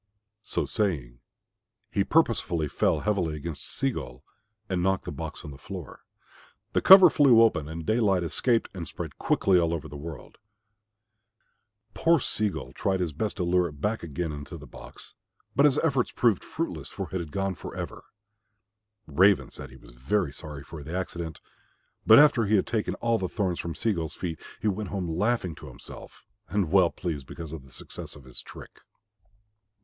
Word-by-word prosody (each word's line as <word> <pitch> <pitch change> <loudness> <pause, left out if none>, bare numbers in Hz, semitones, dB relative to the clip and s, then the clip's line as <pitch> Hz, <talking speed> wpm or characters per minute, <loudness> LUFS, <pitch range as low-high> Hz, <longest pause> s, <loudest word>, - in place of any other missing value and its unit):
So - - -1
saying 70 - -2 0.7
he 100 - +2
purposely 100 - +2
fell - - +1
heavily 95 -7 0
against 75 +1 -6
Sea 135 0 0
gull 60 - -7 0.4
and 95 -3 -1
knocked 95 +1 +1
the - - -4
box - - -7
on 75 - -7
the 70 - -12
floor. - - -9 0.7
The - - +2
cover 190 -1 +10
flew 125 -6 +6
open 80 -10 +2
and 80 0 -6
daylight 105 -4 +2
escaped 115 +8 +1
and 85 -4 -6
spread - - -7
quickly 95 -2 +3
over 85 -1 +1
all - - -2
the 75 - -9
world. 75 +1 -9 1.5
Poor 165 +8 +3
Sea 110 -4 0
gull - - -7
tried 95 -1 0
his 85 -4 -1
best 105 +10 -3
to 90 - -1
lure 90 0 +2
it 75 -3 -11
back 105 +8 -1
again 85 0 -3
into 75 -1 -7
the - - -11
box, - - -11 0.4
but 140 - +5
his 145 -1 +4
efforts 135 -7 +1
proved 115 -6 +2
fruitless, - - -4
for - - -5
it 95 - -1
had 80 -4 -6
gone 95 -1 -1
for - - -9
ever. - - -6 1.0
Raven 95 +6 +3
said - - -9
he 65 - -14
was - - -16
very 70 +5 -1
sorry 75 -2 -7
for 80 +1 -9
the 80 +5 -4
accident, 85 -4 -5 0.7
but - - +10
after 145 -6 +6
he 110 - +3
had 95 - +3
taken 110 -3 -1
all 115 -1 +1
the 95 - -2
thorns 95 -5 -1
from 85 -2 -4
Sea 110 +5 +1
gull's 80 -4 -4
feet 85 -3 -4 0.2
he - - -1
went 105 -1 -1
home 95 -3 -3
laughing 90 +2 0
to - - -10
himself - - -12 0.2
and 95 -6 0
well 95 -3 +5
pleased 75 -8 -5
because 80 -2 -8
of 80 -4 -7
the 65 - -18
success - - -8
of 75 - -13
his 65 -1 -7
trick. - - -13
90 Hz, 185 wpm, -27 LUFS, 80-105 Hz, 1.5 s, cover